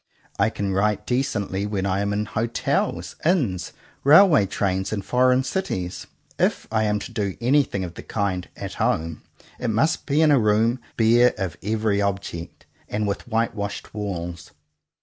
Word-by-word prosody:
I -, -, +4 dB
can 100 Hz, -1 st, -3 dB
write 105 Hz, +2 st, +1 dB
decently 105 Hz, -7 st, -1 dB
when 100 Hz, -2 st, -2 dB
I 95 Hz, 0 st, 0 dB
am 100 Hz, 0 st, 0 dB
in 105 Hz, +1 st, -1 dB
hotels, 115 Hz, +2 st, -1 dB
inns, 130 Hz, -, +1 dB, 0.3 s
railway 150 Hz, -, +7 dB
trains, 95 Hz, -1 st, -1 dB
and 100 Hz, -3 st, -3 dB
foreign 125 Hz, +1 st, +3 dB
cities. 95 Hz, -, -3 dB, 0.3 s
If -, -, +1 dB
I 110 Hz, -1 st, +2 dB
am 105 Hz, 0 st, +1 dB
to 105 Hz, -, -7 dB
do 100 Hz, -4 st, -2 dB
anything 125 Hz, -5 st, +2 dB
of 85 Hz, -2 st, -6 dB
the -, -, -9 dB
kind 95 Hz, -4 st, -2 dB
"at -, -, -6 dB
home," 80 Hz, -1 st, 0 dB, 0.4 s
it 120 Hz, -, -1 dB
must 140 Hz, +10 st, +1 dB
be 150 Hz, +2 st, +3 dB
in 155 Hz, -, +5 dB
a 140 Hz, -, +5 dB
room 110 Hz, +3 st, +2 dB, 0.2 s
bare 120 Hz, +2 st, +5 dB
of 95 Hz, -5 st, -3 dB
every 105 Hz, -1 st, 0 dB
object, 95 Hz, -4 st, -4 dB, 0.2 s
and 105 Hz, 0 st, -1 dB
with 100 Hz, -, -3 dB
white 115 Hz, 0 st, 0 dB
washed 100 Hz, -2 st, -5 dB
walls. 85 Hz, -6 st, -5 dB
105 Hz, 165 wpm, -23 LUFS, 95-120 Hz, 0.4 s, railway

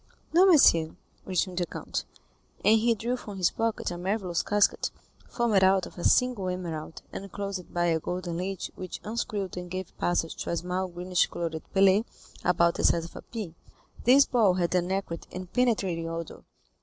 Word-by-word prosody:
"No, 365 Hz, +4 st, +7 dB
monsieur," 170 Hz, -, +5 dB, 0.3 s
returned 185 Hz, -1 st, -1 dB
the 175 Hz, -, -1 dB
count; -, -, -4 dB, 0.6 s
and 220 Hz, +1 st, +6 dB
he 230 Hz, +1 st, +2 dB
drew 235 Hz, +4 st, -2 dB
from 210 Hz, -5 st, -8 dB
his 180 Hz, -2 st, +2 dB
pocket 225 Hz, -5 st, -1 dB
a 175 Hz, -, -5 dB
marvellous 185 Hz, -2 st, -1 dB
casket, 205 Hz, -1 st, +2 dB, 0.4 s
formed 225 Hz, -6 st, +2 dB
out 190 Hz, 0 st, +4 dB
of -, -, -12 dB
a 175 Hz, -, -7 dB
single 245 Hz, -7 st, +2 dB
emerald 165 Hz, -4 st, -5 dB
and 195 Hz, -1 st, -7 dB
closed 195 Hz, -2 st, -5 dB
by 175 Hz, 0 st, 0 dB
a 165 Hz, -2 st, +2 dB
golden 175 Hz, 0 st, -4 dB
lid 190 Hz, +2 st, -3 dB
which 185 Hz, -1 st, -7 dB
unscrewed 210 Hz, -4 st, -3 dB
and 180 Hz, 0 st, -6 dB
gave 185 Hz, 0 st, -6 dB
passage 175 Hz, -2 st, 0 dB
to -, -, -4 dB
a 170 Hz, -, 0 dB
small 180 Hz, +2 st, -2 dB
greenish 180 Hz, 0 st, 0 dB
colored 165 Hz, -2 st, -4 dB
pellet 195 Hz, +3 st, +4 dB, 0.4 s
about 170 Hz, -1 st, +3 dB
the -, -, -3 dB
size 165 Hz, -1 st, +3 dB
of 170 Hz, -, -12 dB
a -, -, -7 dB
pea. 215 Hz, -8 st, -6 dB, 0.5 s
This 270 Hz, +4 st, +7 dB
ball 220 Hz, -8 st, +3 dB
had 175 Hz, -1 st, 0 dB
an 180 Hz, 0 st, +1 dB
acrid 190 Hz, -4 st, -3 dB
and 180 Hz, 0 st, -8 dB
penetrating 195 Hz, -9 st, +1 dB
odor. 165 Hz, -1 st, -6 dB
185 Hz, 180 wpm, -28 LUFS, 175-210 Hz, 0.6 s, No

